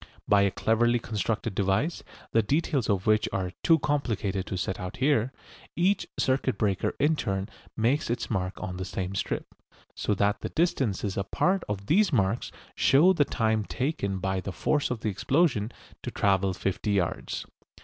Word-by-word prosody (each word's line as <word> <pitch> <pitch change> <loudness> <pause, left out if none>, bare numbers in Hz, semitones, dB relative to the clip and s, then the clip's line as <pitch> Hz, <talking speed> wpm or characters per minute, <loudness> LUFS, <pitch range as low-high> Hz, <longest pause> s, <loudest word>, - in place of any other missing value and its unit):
By 100 -1 +5
a 100 - +4
cleverly 120 +4 +2
constructed 110 -1 -2
device, 100 - 0 0.3
the 115 - +4
details 140 +2 0
of 100 -2 +1
which 110 -1 +3
are 95 -2 -2
too 165 - +5
complicated 110 - -1
to 95 - -3
set 90 +1 -2
out 90 -2 -6
here, 130 -2 +2 0.4
each 185 +4 +2
circuit 130 -1 +1
breaker 100 -4 0
in 155 +2 +3
turn 95 -7 -2 0.3
makes 120 +6 +1
its 120 - -1
mark 95 -4 -1
on 90 0 -5
the 95 - -3
same 95 0 -4
strip, 95 - -3 0.4
so 105 - -1
that 100 +1 +1
the - - -3
distances 120 - 0
apart 180 - +1
of 100 -1 -3
these 195 - +3
marks 115 -2 +1 0.2
show 165 +8 +5
the 150 -5 +3
time 110 -4 0
taken 125 -5 -2
by 95 0 -1
the 100 - -5
force 145 - 0
of 125 -3 -3
the 110 - 0
explosion 120 - +1 0.3
to - - -4
travel 95 -1 +1
fifty 95 +2 -1
yards. 90 -4 -1
110 Hz, 170 wpm, -27 LUFS, 95-135 Hz, 0.4 s, By